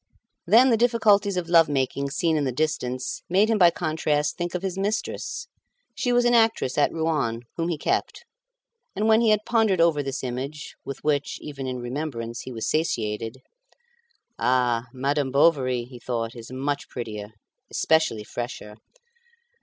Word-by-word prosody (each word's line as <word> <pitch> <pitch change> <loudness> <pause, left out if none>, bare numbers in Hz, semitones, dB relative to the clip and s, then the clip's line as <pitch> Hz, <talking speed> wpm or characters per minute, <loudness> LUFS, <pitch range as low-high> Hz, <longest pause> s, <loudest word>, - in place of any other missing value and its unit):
Then 250 +3 +6
the 230 - +4
difficulties 210 -4 +3
of 175 -2 -2
love 165 -2 +5
making 140 0 -1
seen 165 +3 0
in 150 - +1
the 130 - 0
distance 130 -2 -2
made 200 +5 +3
him 220 - +2
by 175 -2 +8
contrast 155 -3 -1
think 175 0 -4
of 180 - -3
his 190 -2 -2
mistress. 215 - -3 0.5
She 245 - -1
was 245 0 +3
an 240 - +4
actress 225 - +3
at 145 - +3
Rouen, 150 -8 -1
whom 165 0 -1
he 170 -3 -1
kept; - - -2 0.7
and 210 +3 0
when 220 +1 +5
he 230 - +3
had 215 0 +2
pondered 220 -6 +2
over 165 -3 +4
this 135 -1 -4
image, 135 +4 -5
with 135 - -7
which, 145 -2 0
even 140 -3 -6
in 130 -1 -3
remembrance, 120 -2 -4
he 130 - -8
was 115 -2 -4
satiated 115 -5 -2 1.0
"Ah! 125 -1 +1
Madame 140 +2 -1
Bovary," 130 -3 +3
he 125 0 -12
thought, 115 -1 -3
"is 115 0 -10
much 140 +2 -3
prettier, 110 -3 -6 0.4
especially 160 -9 +1
fresher. 110 -2 -6
145 Hz, 160 wpm, -25 LUFS, 125-180 Hz, 1.0 s, by